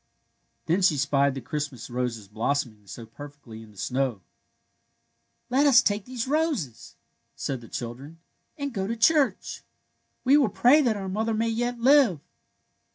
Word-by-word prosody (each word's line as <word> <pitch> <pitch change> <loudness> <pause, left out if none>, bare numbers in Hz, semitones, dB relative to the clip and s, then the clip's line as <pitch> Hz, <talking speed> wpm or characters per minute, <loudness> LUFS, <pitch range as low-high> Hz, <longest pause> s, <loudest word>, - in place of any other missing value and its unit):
Then 175 +4 +1
she 170 -5 +3
spied 140 0 +1
the 135 - -5
Christmas 145 -3 -5
roses 120 -4 -4
blossom 120 +5 -1
ing 105 -1 -27
so 115 +4 -9
perfectly 120 -1 -12
in 110 - -14
the 105 - -20
snow. 130 +5 -1
*^ 100 - -22 1.3
Let 280 +3 +4
us 265 -4 +6
take 205 -1 0
these 250 -1 -4
roses," 290 - -2 0.4
said 130 -3 -4
the 115 - -12
children, 125 +7 -7
'^ - - -20 0.4
and 280 -3 -4
go 195 -3 -2
to 230 - -2
the - - -17
church. 295 +3 +2 0.6
We 270 +3 +5
will 275 -7 +3
pray 265 +9 +5
that 235 -6 +1
our 195 -1 -5
mother 220 +4 -1
may 225 +1 0
yet 240 +2 -2
live." 260 - +5
160 Hz, 170 wpm, -26 LUFS, -, 1.3 s, us